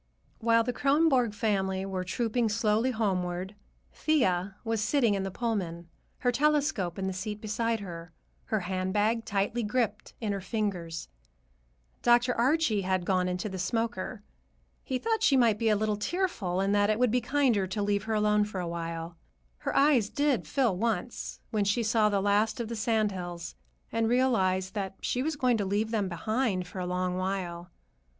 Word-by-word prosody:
While 230 0 +4
the 245 +1 -2
Kronborg 275 -6 +3
family 195 -3 0
were 190 -1 -3
trooping 230 +4 0
slowly 220 +2 +2
homeward, 190 -5 -1 0.4
Thea 190 - +1
was 225 -2 -1
sitting 235 -1 +2
in 195 - 0
the 195 - -2
Pullman, 185 -6 -3 0.3
her 245 - +1
telescope 280 - +1
in 190 - -2
the 190 - -1
seat 210 +3 -4
beside 225 +1 -1
her, 170 -3 -8 0.3
her 215 -2 -1
handbag 195 +5 0
tightly 205 +4 0
gripped 220 -1 -2
in 215 -3 -2
her 200 -1 -2
fingers. 185 -5 -3 0.9
Dr. 240 +1 +4
Archie 255 -3 +2
had 185 -1 0
gone 185 -1 +1
into 180 +2 -2
the 190 -2 -5
smoker. 220 0 -2 0.6
He 260 - -2
thought 445 - -1
she 280 -11 +4
might 230 -4 +3
be 225 -1 +2
a 215 - +4
little 210 0 0
tearful, 210 - -1
and 195 +1 +1
that 205 0 +3
it 215 - +2
would 250 -1 +3
be 250 +1 +2
kinder 240 -6 +2
to 195 +3 -3
leave 205 +1 0
her 220 0 -1
alone 210 0 +3
for 205 -2 -4
a 175 - -3
while. 165 0 -5 0.4
Her - - -3
eyes 275 -7 +4
did 285 -3 0
fill 250 -9 +1
once, 230 +4 -2
when 215 -2 +1
she 210 +4 +1
saw 215 -1 +3
the 200 -1 +1
last 205 +3 +2
of 230 -2 -3
the 235 - -3
sand 220 -1 +1
hills 175 -2 -6 0.4
and 225 0 +1
realized 190 -7 +2
that 195 -2 -3
she 250 - 0
was 310 +3 -1
going 255 -4 +2
to 205 - 0
leave 210 +3 0
them 205 -4 0
behind 195 +2 -1
for 180 +1 -8
a 180 - -2
long 180 0 -1
while. 185 -2 -3
210 Hz, 180 wpm, -29 LUFS, 190-235 Hz, 0.9 s, While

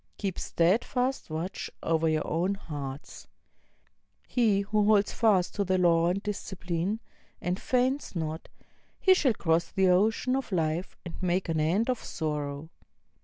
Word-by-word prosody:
Keep 195 -3 -3
steadfast 240 +9 0
watch 160 +4 -4
over 165 0 +2
your 155 -1 0
own 180 +5 0
hearts. 145 -6 -7 1.0
He 220 -5 +2
who 210 +1 +1
holds 210 -1 +3
fast 200 -6 +2
to 205 - 0
the 185 -1 +1
law 170 -2 +4
and 195 +3 -1
discipline, 190 -1 -3 0.4
and 180 +1 -2
faints 255 -1 0
not, 160 -1 -4 0.5
he 380 - +6
shall 270 -11 +2
cross 165 -2 +1
the 190 -1 +3
ocean 220 +7 +2
of 270 -4 -3
life 165 0 -1
and 170 - -8
make 180 0 0
an 160 -1 0
end 175 +9 +2
of 250 -2 -1
sorrow. 150 0 -4
185 Hz, 145 wpm, -28 LUFS, 165-210 Hz, 1.0 s, he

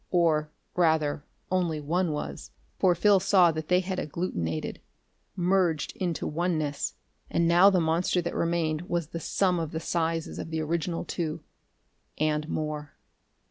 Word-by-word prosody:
Or, 160 -4 +2 0.3
rather, 160 -4 +2 0.3
only 175 -4 +1
one 165 +4 0
was. 150 - -5 0.3
For 180 -2 +4
Phil 200 +3 +5
saw 180 -2 +5
that 155 -1 -5
they 180 0 +4
had 185 0 -3
agglutenated 85 - -3 0.6
merged 180 -4 +1
into 175 -3 -2
oneness 155 -3 -1 0.3
and 170 - +2
now 175 +4 +7
the 190 -2 +3
monster 165 +2 +1
that 170 0 -2
remained 170 -1 -1
was 170 -3 -1
the 170 - -5
sum 180 +1 +1
of 165 -2 -2
the 160 - -2
sizes 165 -1 -2
of - - -5
the 160 0 -2
original 165 +2 -2
two. 160 -3 -3 0.7
And 155 0 0
more.... 150 -1 -3
165 Hz, 145 wpm, -28 LUFS, 155-180 Hz, 0.7 s, now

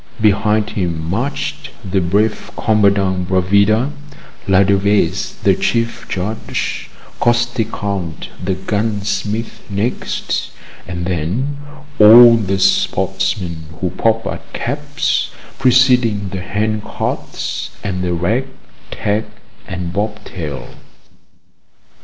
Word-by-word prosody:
Behind 105 0 +2
him 85 -5 -2
marched 125 +9 -3 0.2
the 95 0 +1
brave 100 +5 0
Commandant 100 -4 +2
Bravida, 100 +7 +3 0.6
Ladevese 100 +1 +2
the - - +5
Chief 115 0 -1
Judge, 100 +4 -3 0.3
Costecalde 110 - -1
the 95 +1 0
gunsmith 105 +2 -2
next, 100 +5 -2 0.4
and 85 -1 -4
then 95 - -1 0.4
all 115 +2 +10
the 95 -4 0
sportsmen 85 -3 0
who 90 -2 -1
pop 115 0 +1
at - - -6
caps, - - -1 0.3
preceding 125 -6 +4
the 95 -1 -4
hand 105 +2 -1
carts - - -4
and 90 -2 -2
the 90 -1 0
rag, 110 +10 0 0.4
tag, 105 +2 -1 0.4
and 90 -2 -4
bobtail. 100 -8 -5
100 Hz, 95 wpm, -17 LUFS, 95-110 Hz, 0.6 s, all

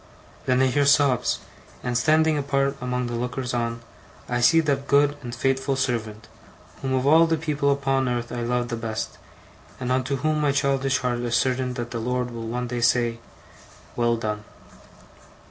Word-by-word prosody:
Then 130 0 +3
I - - +5
hear 140 +2 +2
sobs; 140 -3 +3 0.4
and, 125 -1 -2
standing 155 +5 +3
apart 140 -1 0
among 125 0 -1
the 120 - -4
lookers 125 +1 -3
on, 115 -1 -2 0.5
I 120 0 -1
see 165 +7 +6
that 140 -3 -1
good 145 +1 +4
and 120 -2 -6
faithful 135 +2 0
servant, 115 -4 -2 0.5
whom 130 -1 -1
of 130 0 0
all 160 +3 +6
the 165 0 +1
people 150 -3 0
upon 135 -2 +1
earth 120 -1 -3
I 120 - -3
love 120 0 -1
the 120 - -2
best, 110 -1 -4 0.6
and 125 -1 -2
unto 130 +2 0
whom 155 +3 0
my 145 -2 +2
childish 135 -2 +1
heart 125 -1 -1
is 120 -1 -1
certain 125 0 0
that 120 -1 -5
the 115 - -3
Lord 125 +1 -2
will 115 -1 -6
one 125 +2 -2
day 120 0 -3
say: 115 0 +2 0.8
'Well 120 -1 +1
done. 105 -2 -3
125 Hz, 180 wpm, -24 LUFS, 120-140 Hz, 0.8 s, see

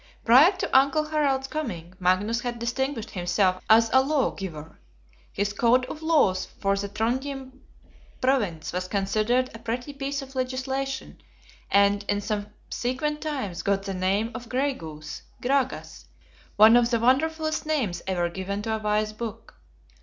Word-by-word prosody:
Prior 265 +10 +8
to 370 - -3
Uncle 280 +3 +4
Harald's 280 -4 +1
coming, 210 - -5
Magnus 195 +6 +1
had 245 -1 -3
distinguished 235 0 -2
himself 185 +1 0
as 225 +1 +6
a 260 - +7
Lawgiver. 195 - -2 0.5
His 205 +1 -1
Code 245 +3 +3
of 300 +4 -8
Laws 300 - +2
for 195 0 +1
the 200 0 -3
Trondhjem 260 +5 -3 0.6
Province 210 - 0
was 180 0 -2
considered 215 +6 0
a 225 - -9
pretty 245 +5 -4
piece 275 0 -3
of 270 0 -12
legislation; 265 +1 -3 0.5
and 200 +1 +3
in 205 - +1
subsequent 235 +8 -3
times 265 - -3
got 200 -1 0
the 195 - -4
name 195 +5 0
of 245 -2 -8
Gray 270 +4 +1
goose 155 - -8 0.2
(Gragas); 265 0 -1 0.5
one 220 +2 +8
of 240 -1 +4
the 235 -2 +1
wonderfulest 310 +6 +1
names 235 - -1
ever 175 -2 0
given 190 +3 -4
to 220 0 -1
a - - -3
wise 215 0 0
Book. 225 0 -7
230 Hz, 145 wpm, -26 LUFS, 200-270 Hz, 0.6 s, Prior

